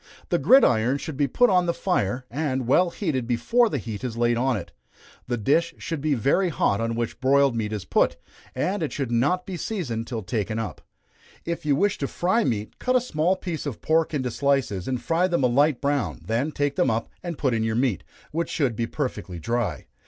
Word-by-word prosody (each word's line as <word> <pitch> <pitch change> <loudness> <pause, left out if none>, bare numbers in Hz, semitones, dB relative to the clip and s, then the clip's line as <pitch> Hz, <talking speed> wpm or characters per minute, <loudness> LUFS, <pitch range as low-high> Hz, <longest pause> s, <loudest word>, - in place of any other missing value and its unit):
The - - +2
gridiron 125 - +5
should 160 0 -6
be 140 +1 +1
put 245 - +3
on 180 -1 +3
the 170 - 0
fire, 125 - -1
and 135 -2 -1
well 175 +9 +4
heated 150 - -2
before 230 - +2
the 145 - -1
meat 110 0 -5
is 120 -3 -4
laid 120 0 +2
on 125 0 +1
it. 85 - -8 0.6
The 120 -1 -1
dish 165 +9 +1
should 165 -4 -4
be 150 -1 +1
very 140 - +2
hot 105 -9 +1
on 115 0 -1
which 120 +2 -3
broiled 135 -1 +4
meat 110 -2 -2
is 105 -4 -4
put, - - +2 0.4
and 195 +1 -1
it 155 - -1
should 135 -4 -3
not 140 +11 +1
be 185 -2 -5
seasoned 135 - -3
till 115 -4 -4
taken 110 +1 -2
up. 105 -9 -4 0.6
If 170 -2 -4
you 145 - +4
wish 200 +7 +1
to 140 - -1
fry 190 - +1
meat, 105 - -3
cut 255 - +1
a - - +6
small 180 -6 0
piece 170 -5 -5
of 130 - -5
pork 160 +1 +2
into 130 -3 -1
slices, 135 -9 0
and 130 -2 -1
fry 165 +9 +1
them 170 -6 0
a - - +5
light 140 +2 +3
brown, 140 -2 -1
then 120 +8 0
take 145 -1 -1
them - - +3
up 115 0 -1
and 170 -3 -5
put 130 -4 +1
in 115 -1 0
your 110 0 0
meat, 120 -6 0 0.3
which 165 +2 -2
should 135 -8 0
be 115 +1 -1
perfectly 105 - -4
dry. 105 - -2
135 Hz, 220 wpm, -25 LUFS, 115-165 Hz, 0.6 s, a